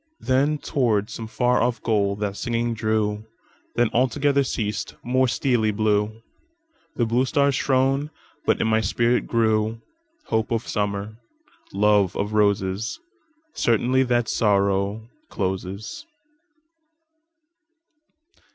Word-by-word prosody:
Then 140 +4 +2
toward 115 -8 0
some 115 - -6
far 125 +2 +1
off 120 0 0
goal 100 -3 +1
that 100 -1 -3
singing 120 +1 -1
drew; 110 -1 -1 0.5
Then 120 -2 +2
altogether 140 +3 +2
ceas'd; 105 -5 -3
more 130 +1 +2
steely 120 -2 +1
blueThe 105 +1 0 0.8
blue 120 +3 +2
stars 140 +1 +2
shone; 135 +2 +1 0.3
but - - +1
in - - +1
my 110 0 +2
spirit 120 +4 +1
grewHope 115 - -2
of 115 -1 -2
Summer, 105 +1 -2 0.5
love 100 -1 +3
of 105 +1 -2
Roses, 100 - 0 0.5
Certainty 120 +3 +2
that 120 -3 +1
Sorrow 100 +1 +1 0.2
closes. 95 - -4
110 Hz, 105 wpm, -23 LUFS, 105-125 Hz, 0.8 s, love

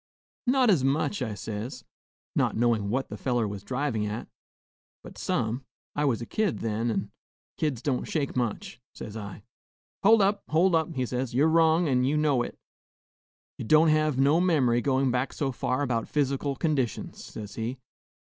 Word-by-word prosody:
'Not 255 -2 +4
as 160 -9 +3
much,' 145 +7 0
I 110 -4 -2
says, 105 +5 -6 0.5
not - - +1
knowin' 115 -3 +2
what 130 +5 -1
the - - -6
feller 120 -4 0
was 100 -1 -6
drivin' 125 -2 -1
at, 110 +3 -5 0.8
'but - - -11
some; 115 +4 -1 0.3
I 150 - +1
was 120 -4 +1
a - - -6
kid 210 - 0
then, 115 +1 -1
and 115 - -2 0.5
kids 140 -6 -1
don't 140 -4 0
shake 145 -4 -2
much,' 120 0 -3
says 105 - -8
I. 105 -2 -7 0.6
'Hold 215 +1 +6
up! 200 +1 +1
hold 170 +4 +3
up!' 160 0 +1
he 130 -1 0
says, 125 0 -3
'you 140 +4 +4
're 160 - +3
wrong, 165 +1 +4
an' 125 -3 +2
ye 140 +4 +1
know 145 -5 +2
it; - - -5 1.0
ye - - -3
don't 155 +7 +5
hev 155 -2 +2
no 145 +5 +4
mem'ry 135 -10 +3
goin' 135 0 +1
back 125 +2 -1
so 140 -2 -1
far 130 +2 -1
about 120 -4 -1
phys'cal 140 -1 0
conditions,' 140 -7 -2
says 105 -2 -8
he. 120 +3 -4
130 Hz, 175 wpm, -27 LUFS, 115-155 Hz, 1.0 s, Hold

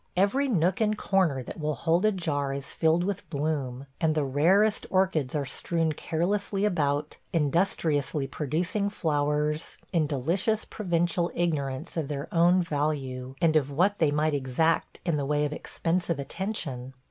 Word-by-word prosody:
Every 230 +9 +3
nook 185 -4 +1
and 215 -1 +2
corner 175 -12 +1
that - - -8
will 150 -1 -1
hold 170 +6 +1
a 215 - +5
jar 145 -7 -1
is 140 0 -5
filled 165 +2 +2
with 195 0 -3
bloom, 140 -4 -2
and 155 -1 +2
the 155 - +2
rarest 185 +11 +3
orchids 185 -8 +1
are 145 -2 0
strewn 165 +4 -1
carelessly 195 +6 -1
about, 150 -6 0 0.2
industriously 155 -3 +1
producing 165 +9 -1
flowers, 150 -3 -1 0.2
in 160 -4 +2
delicious 170 - 0
provincial 175 -3 0
ignorance 145 -5 -2
of 155 -4 -1
their 140 -1 -4
own 175 +2 +5
value 140 -5 -2
and 165 -2 +3
of 145 -3 +3
what 185 +8 +1
they 160 - +4
might 150 +1 +1
exact 145 +4 0
in 170 -4 +1
the 145 - -1
way 150 0 +1
of 150 - -2
expensive 170 +2 -1
attention. 135 - -4
160 Hz, 155 wpm, -27 LUFS, 145-180 Hz, 0.2 s, a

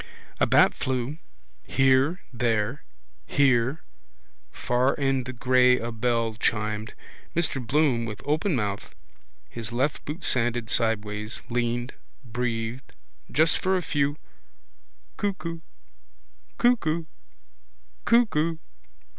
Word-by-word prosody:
A - - +3
bat - - +5
flew. 130 +4 -3 0.4
Here. 135 +6 +2
There. 115 +2 0 0.5
Here. 135 +2 +2 0.7
Far 125 - +1
in 135 -3 0
the 130 - -4
grey 125 0 +4
a 120 0 -4
bell 115 0 0
chimed. 105 -1 -1 0.4
Mr 155 -6 0
Bloom 130 -1 +2
with 105 -2 -6
open 155 +4 +1
mouth, 105 -4 -3 0.5
his 115 - -6
left 130 +5 -1
boot 155 +4 -6
sanded 120 -2 +1
sideways, 105 -1 -1
leaned, 120 +1 -1 0.3
breathed. 120 0 -4 0.4
Just 160 +2 +3
for 190 0 +1
a 180 - -3
few 145 -1 0 1.0
Cuckoo 180 -5 -3 1.0
Cuckoo 170 -10 +2 1.0
Cuckoo. 170 -9 +3
125 Hz, 100 wpm, -26 LUFS, 115-150 Hz, 1.0 s, bat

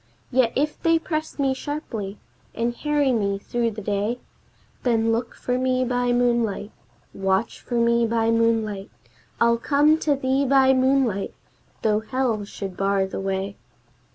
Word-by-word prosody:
Yet 250 -2 +3
if 295 +2 -1
they 330 0 +4
press 315 -1 -4
me 275 -2 +1
sharply, 235 -8 -5 0.4
and 235 +1 -1
harry 295 -1 +1
me 200 -4 0
through 235 +3 -1
the 215 -1 -7
day, 205 +4 -1 0.6
Then 230 -2 +2
look 230 +2 -2
for 250 0 -2
me 255 0 +1
by 245 0 0
moonlight, 235 -4 +1 0.4
Watch 195 +3 0
for 245 - -5
me 235 0 +3
by 225 0 +1
moonlight, 225 -3 +1 0.5
I'll 235 0 +3
come 295 +5 +3
to 295 -3 +2
thee 265 0 +1
by 265 -1 +5
moonlight, 260 -6 +1 0.5
though 215 -1 +3
hell 230 -2 -1
should 195 -2 -7
bar 195 0 +1
the 190 - -5
way." 195 +1 -3
235 Hz, 150 wpm, -24 LUFS, 210-265 Hz, 0.6 s, by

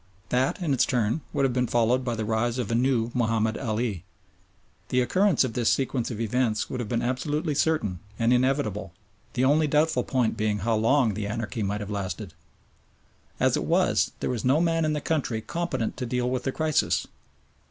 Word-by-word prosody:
That 130 +7 +1
in 150 -5 +1
its 130 - +3
turn 120 +4 0
would 140 - +1
have 130 - 0
been 125 0 +1
followed 120 +2 +2
by 120 -2 -2
the 110 -1 -3
rise 115 +2 0
of 120 -4 -2
a - - +1
new 120 -1 +1
Mahomed 115 -2 +1
Ali. 110 -6 -2 0.9
The 125 - +2
occurrence 185 +7 +3
of 125 -3 -3
this 120 -1 +2
sequence 130 -3 0
of 115 -4 -5
events 115 -1 0
would 125 - -3
have 115 -4 -4
been 120 -1 0
absolutely 150 +5 -1
certain 135 - 0 0.2
and 115 +1 +3
inevitable, 125 - 0 0.4
the 130 +1 +1
only 150 +3 +3
doubtful 150 -3 +2
point 125 -3 0
being 105 -1 0
how 115 - +2
long 115 +1 +3
the 105 0 -3
anarchy 110 +1 -3
might 105 +1 -1
have 105 0 -6
lasted. 95 -2 -4 1.1
As - - +3
it - - -1
was, - - +2
there - - -1
was 120 -4 -3
no 135 +4 +3
man 165 -1 +2
in 155 - +1
the 150 - -2
country 140 -9 -1
competent 140 -3 -3
to 125 -1 -3
deal 125 +1 -1
with 125 0 -2
the 135 - +1
crisis. 155 +1 +1
125 Hz, 195 wpm, -26 LUFS, 110-135 Hz, 1.1 s, its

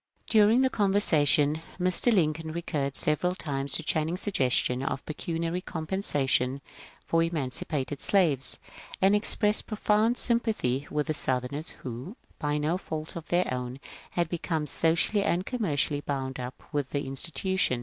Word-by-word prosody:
During 220 +3 +5
the 260 - +3
conversation 160 -7 +3 0.2
Mr. 185 +6 +4
Lincoln 160 -5 +1
recurred 150 -5 -2
several 180 +4 +1
times 140 -5 -1
to 160 - 0
Channing's 160 +4 0
suggestion 130 - +1
of 135 0 -3
pecuniary 165 +3 -3
compensation 145 -7 0 0.5
for 165 - +2
eman 160 -6 -1
cipated 140 +1 -3
slaves, 155 -10 +2 0.4
and 195 +2 +5
expressed 210 0 +1
profound 215 +2 +2
sympathy 215 - 0
with 150 -1 -1
the 155 - -1
Soathemers 130 +2 -1
who, 130 - -6 0.2
by 150 0 0
no 155 +5 0
fault 155 -3 -5
of 165 -2 -7
their 175 +1 +2
own, 125 +1 -4 0.3
had 175 -2 0
become 160 -2 -2
so 160 +3 +2
cially 205 +3 +1
and 180 -1 0
commercially 155 - 0
bound 135 -2 -3
up 125 +1 -7
with 145 -3 -1
the 145 0 -2
institution. 135 +1 0
160 Hz, 145 wpm, -28 LUFS, 140-185 Hz, 0.5 s, During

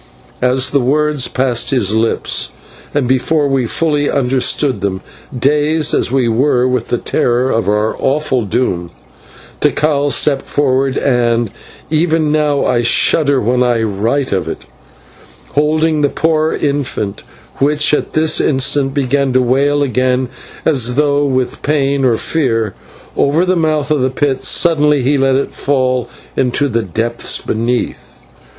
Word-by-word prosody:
As 130 +1 +1
the 140 - +2
words 145 +1 +1
passed 125 -2 -1
his 110 -6 +1
lips, 110 - 0 0.4
and 145 -4 0
before 145 +4 +1
we 135 -3 0
fully 150 +1 0
understood 130 -2 0
them, 95 -1 -2 0.4
dazed 150 +3 +1
as - - 0
we 130 -2 +1
were 125 +2 +2
with 125 -2 -1
the 120 - -1
horror 125 +2 +1
of 115 -2 0
our 105 +1 0
awful 135 -2 0
doom, 95 -5 -2 0.7
Tikal 145 -2 +1
stepped 140 -1 +1
forward 135 -1 0
and 120 -4 +1 0.4
even 160 -1 +1
now 150 -2 +1
I 120 -1 +1
shudder 140 +4 +2
when 125 +2 0
I 120 -2 +1
write 110 +6 -1
of 95 -4 -1
it - - -6 0.9
holding 155 +1 +1
the 145 - +2
poor 160 0 0
infant, 140 -8 -2 0.4
which 150 +2 +2
at - - -1
this 155 0 +2
instant 135 0 0
began 140 -1 0
to 130 - +3
wail 140 +4 +1
again 130 -1 0 0.4
as 125 -6 +1
though 145 0 +2
with 130 -2 -2
pain 140 -2 0
or 120 -3 +2
fear, 115 -11 -1 0.4
over 155 +6 +2
the 185 0 +1
mouth 155 -3 0
of 150 -3 +2
the 130 - +1
pit, 135 0 -1
suddenly 150 -2 +2
he 140 +2 +1
let 135 0 +2
it 135 - -1
fall 130 -3 -1 0.3
into 130 +2 +1
the 115 -1 0
depths 115 +4 -1
beneath. 120 +2 -3
135 Hz, 145 wpm, -15 LUFS, 125-145 Hz, 0.9 s, to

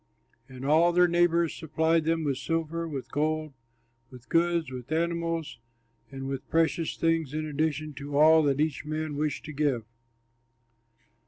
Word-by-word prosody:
And 130 0 -8
all 160 +4 +4
their 180 +1 +5
neighbors 170 -1 +2
supplied 160 0 0
them 165 0 +1
with 140 -4 -1
silver, 165 0 -2
with 140 -5 -6
gold, 155 0 -1 0.6
with 125 -2 -15
goods, 170 -3 +1
with 125 +1 -8
animals, 165 -2 -1 0.5
and 135 0 -6
with 135 -1 -5
precious 165 0 +1
things 165 -3 0
in 155 0 -2
addition 155 0 -2
to 140 0 -4
all 160 +2 +7
that 140 -1 +1
each 155 -2 0
man 155 0 -3
wished 150 0 -2
to 155 - -7
give. 140 -6 0
155 Hz, 150 wpm, -28 LUFS, 145-165 Hz, 0.6 s, all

